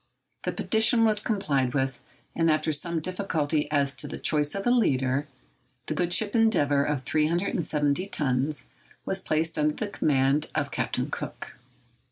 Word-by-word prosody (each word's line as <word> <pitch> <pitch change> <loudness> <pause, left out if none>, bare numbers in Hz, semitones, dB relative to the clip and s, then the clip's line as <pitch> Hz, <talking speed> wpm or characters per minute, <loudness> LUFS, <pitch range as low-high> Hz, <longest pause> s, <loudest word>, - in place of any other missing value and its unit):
The - - 0
petition 225 +1 +3
was 215 -1 +3
complied 150 - -1
with, 135 -2 -1 0.4
and 165 0 +2
after 155 0 +1
some 165 +2 0
difficulty 160 -5 -1
as 140 -2 +1
to - - -1
the - - -6
choice 150 0 +1
of 195 - -4
a 245 - +3
leader, 135 - +1 0.6
the - - -3
good 175 +2 -1
ship 205 +3 +3
'Endeavour,' 145 -11 +3
of 145 -3 -1
370 155 +2 0
tons, 140 -3 0 0.4
was 190 0 0
placed 160 -1 -1
under 150 0 +1
the 215 - -3
command 140 -4 +1
of - - -1
Captain - - -2
Cook. - - -6
155 Hz, 155 wpm, -26 LUFS, 145-190 Hz, 0.6 s, petition